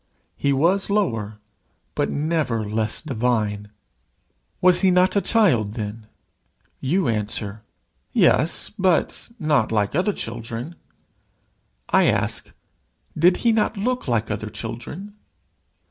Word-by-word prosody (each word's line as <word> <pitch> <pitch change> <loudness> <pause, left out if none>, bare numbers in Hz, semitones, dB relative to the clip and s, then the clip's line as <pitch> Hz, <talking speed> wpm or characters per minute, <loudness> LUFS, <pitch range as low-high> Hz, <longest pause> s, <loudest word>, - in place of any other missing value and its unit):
He 140 - 0
was 170 +10 +2
lower, 115 - 0 0.6
but - - 0
never 145 -8 -1
less 110 +4 -2
divine. 110 -6 -1 0.9
Was 180 -1 +5
he 190 - +5
not 180 +2 +3
a 200 - +3
child 150 - +2
then? 105 0 -6 0.7
You 170 +7 +1
answer, 105 -1 -2 0.5
"Yes, 155 +5 +2
but 185 +3 +1
not 150 - +1
like 105 -2 +1
other 180 +7 +2
children." 115 +5 -5 1.2
I - - +4
ask, - - 0 0.7
"Did 175 +3 +4
he 235 - +6
not 220 -1 +1
look 250 +2 -1
like 115 -3 0
other 105 +1 -3
children?" 120 - -7
130 Hz, 115 wpm, -23 LUFS, 110-180 Hz, 1.2 s, he